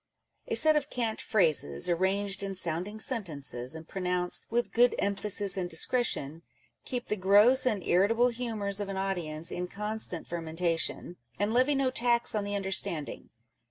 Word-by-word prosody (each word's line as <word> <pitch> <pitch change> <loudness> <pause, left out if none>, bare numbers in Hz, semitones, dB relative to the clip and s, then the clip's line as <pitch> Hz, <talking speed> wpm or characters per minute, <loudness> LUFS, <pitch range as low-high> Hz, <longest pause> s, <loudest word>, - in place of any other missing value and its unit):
A - - -2
set 310 0 +7
of 295 -1 0
cant 230 -3 -2
phrases, 155 - +2
arranged 195 +3 0
in 195 -1 -4
sounding 180 +4 -2
sentences, 155 - -2
and 160 0 -10
pronounced 180 -1 -1
" - - -37
with 240 +1 -1
good 245 +1 +3
emphasis 200 0 +1
and 180 -2 -3
discretion," 165 - 0 0.4
keep 250 -2 -4
the 210 - -2
gross 210 +7 +4
and 210 -7 -1
irritable 225 +7 +3
humours 220 -5 -3
of 205 -1 -4
an 195 - -4
audience 175 -4 -2
in 180 0 -4
constant 210 -3 -4
fermentation; 165 +1 -2 0.2
and 205 +2 -1
levy 260 +4 +2
no 270 -1 +1
tax 240 -1 +1
on 210 -2 -1
the 205 0 -3
understanding. 190 -5 -1
200 Hz, 160 wpm, -29 LUFS, 175-230 Hz, 0.4 s, set